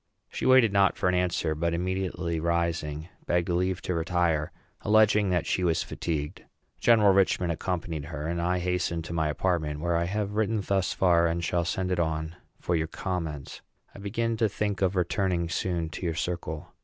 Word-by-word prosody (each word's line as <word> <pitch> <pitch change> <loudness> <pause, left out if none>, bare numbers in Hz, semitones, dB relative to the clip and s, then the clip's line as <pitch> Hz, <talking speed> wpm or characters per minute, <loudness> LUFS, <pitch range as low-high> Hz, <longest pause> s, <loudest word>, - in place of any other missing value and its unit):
She - - -2
waited 130 -5 +6
not 100 -1 +3
for - - 0
an - - +1
answer, 90 -3 +1
but, 85 +2 -1
immediately 90 -2 -2
rising, 85 -2 -1 0.2
begged 85 0 +1
leave 90 +1 0
to 90 - -1
retire, 85 -2 0 0.3
alleging 105 -1 +4
that 90 -1 +1
she 90 - 0
was 85 -2 +2
fatigued. 75 0 -4 0.4
General 110 -4 +5
Richman 95 -2 +2
accompanied 85 -3 -3
her, 75 -1 -5
and 85 +1 -2
I 90 +1 +1
hastened 90 -2 -1
to 80 - -6
my 80 -2 +1
apartment, 75 -2 -1
where 85 +2 0
I 85 +1 +1
have 100 +2 -2
written 110 +1 +1
thus 95 -1 0
far, 85 -2 +3
and 85 +1 -1
shall 85 0 0
send 90 +2 -1
it 90 - 0
on 80 0 -1 0.2
for 90 - -1
your 80 0 0
comments. 80 -6 -4 0.3
I - - -11
begin 115 +3 -1
to 110 -1 +2
think 105 -1 -2
of 95 0 +2
returning 90 -1 0
soon 85 -1 -1
to - - -8
your 80 - -2
circle. 85 -2 -4
85 Hz, 185 wpm, -27 LUFS, 85-95 Hz, 0.4 s, waited